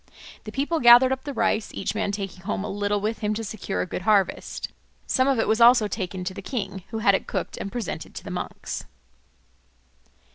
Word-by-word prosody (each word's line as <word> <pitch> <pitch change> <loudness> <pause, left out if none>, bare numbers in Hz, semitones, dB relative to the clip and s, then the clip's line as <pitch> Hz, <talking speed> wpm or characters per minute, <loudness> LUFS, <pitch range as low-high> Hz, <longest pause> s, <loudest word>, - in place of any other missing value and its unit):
The 215 - -6
people 290 +7 0
gathered 245 +1 +8
up 265 +1 -2
the 285 - -3
rice, 220 -2 +1
each - - -2
man 200 - -1
taking 195 -2 -5
home 195 0 -3
a - - -4
little 205 +1 0
with 215 +2 -2
him 210 -1 -1
to 225 - -3
secure 215 -2 -3
a - - -1
good 180 - -5
harvest. 200 -1 +1 0.4
Some 260 0 +2
of 270 -2 +3
it 225 - +1
was 220 +2 +2
also 235 -2 +7
taken 185 -2 -4
to 185 +1 -3
the - - -7
king, 195 -7 -4
who 225 - -4
had 200 - +7
it 195 - 0
cooked - - -3
and 200 - -5
presented 235 -6 -5
to - - -7
the - - -7
monks. - - -5
215 Hz, 215 wpm, -25 LUFS, 195-240 Hz, 0.4 s, gathered